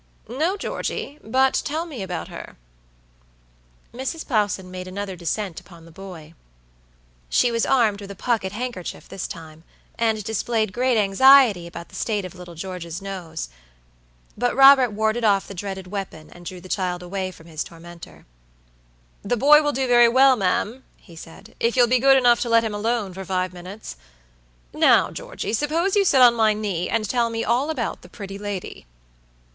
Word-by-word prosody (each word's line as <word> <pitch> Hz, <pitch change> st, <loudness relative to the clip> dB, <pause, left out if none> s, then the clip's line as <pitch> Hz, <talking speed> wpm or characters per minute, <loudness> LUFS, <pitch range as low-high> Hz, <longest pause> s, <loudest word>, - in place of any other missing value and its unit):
"No, 315 Hz, -, -1 dB
Georgey, 295 Hz, -6 st, -4 dB
but 260 Hz, +4 st, +2 dB
tell 315 Hz, +3 st, -3 dB
me 290 Hz, -10 st, -8 dB
about 180 Hz, -3 st, -5 dB
her." -, -, -10 dB, 1.4 s
Mrs. 265 Hz, +6 st, -5 dB
Plowson 205 Hz, -6 st, -1 dB
made 185 Hz, 0 st, -7 dB
another 195 Hz, 0 st, -5 dB
descent 180 Hz, +2 st, -3 dB
upon 170 Hz, -3 st, -16 dB
the 165 Hz, -, -15 dB
boy. 165 Hz, -3 st, -11 dB, 1.0 s
She 245 Hz, -, +3 dB
was 230 Hz, 0 st, 0 dB
armed 225 Hz, -6 st, +2 dB
with 200 Hz, -, -9 dB
a 200 Hz, -, -8 dB
pocket 220 Hz, -3 st, -1 dB
handkerchief 230 Hz, -4 st, -6 dB
this 190 Hz, -, -5 dB
time, 160 Hz, -1 st, -10 dB, 0.4 s
and 220 Hz, -2 st, +1 dB
displayed 220 Hz, 0 st, -1 dB
great 250 Hz, +1 st, +1 dB
anxiety 215 Hz, -2 st, +5 dB
about 170 Hz, 0 st, -9 dB
the -, -, -14 dB
state 210 Hz, -4 st, -2 dB
of 185 Hz, -, -8 dB
little 180 Hz, -2 st, -11 dB
George's 175 Hz, -1 st, -6 dB
nose, 185 Hz, -, -6 dB, 0.9 s
but 245 Hz, +2 st, 0 dB
Robert 270 Hz, -1 st, +7 dB
warded 220 Hz, +2 st, -1 dB
off 200 Hz, -3 st, +2 dB
the -, -, -8 dB
dreaded 190 Hz, 0 st, -6 dB
weapon, 185 Hz, -5 st, -7 dB
and 175 Hz, -1 st, -12 dB
drew 185 Hz, -2 st, -7 dB
the 185 Hz, -, -12 dB
child 180 Hz, -2 st, -2 dB
away 185 Hz, +1 st, -3 dB
from 165 Hz, -3 st, -15 dB
his 160 Hz, -3 st, -4 dB
tormentor. 170 Hz, 0 st, -13 dB, 1.0 s
"The 240 Hz, +4 st, -1 dB
boy 295 Hz, +5 st, +7 dB
will 295 Hz, -1 st, 0 dB
do 265 Hz, -1 st, -1 dB
very 240 Hz, -1 st, +6 dB
well, 260 Hz, +2 st, +5 dB
ma'am," 215 Hz, +5 st, -1 dB
he 170 Hz, -, -17 dB
said, 165 Hz, +7 st, -13 dB
"if 235 Hz, +2 st, 0 dB
you'll 245 Hz, -, +7 dB
be 250 Hz, +1 st, +3 dB
good 270 Hz, +1 st, +6 dB
enough 245 Hz, -2 st, +4 dB
to 240 Hz, -, -2 dB
let 230 Hz, 0 st, +4 dB
him 220 Hz, -2 st, -3 dB
alone 210 Hz, -2 st, -1 dB
for 190 Hz, +1 st, -7 dB
five 185 Hz, -1 st, -2 dB
minutes. 185 Hz, +4 st, -9 dB, 0.8 s
Now, -, -, +4 dB
Georgey, -, -, -6 dB
suppose 325 Hz, -, 0 dB
you 400 Hz, -1 st, +3 dB
sit 270 Hz, -7 st, +4 dB
on 240 Hz, -1 st, +8 dB
my 220 Hz, -2 st, +3 dB
knee, 205 Hz, -5 st, -3 dB
and 220 Hz, -2 st, 0 dB
tell 235 Hz, +1 st, +1 dB
me 230 Hz, 0 st, -3 dB
all 250 Hz, +6 st, +1 dB
about 315 Hz, -, -3 dB
the -, -, -15 dB
pretty 195 Hz, -2 st, -8 dB
lady." 200 Hz, -, -6 dB
210 Hz, 175 wpm, -23 LUFS, 185-245 Hz, 1.4 s, on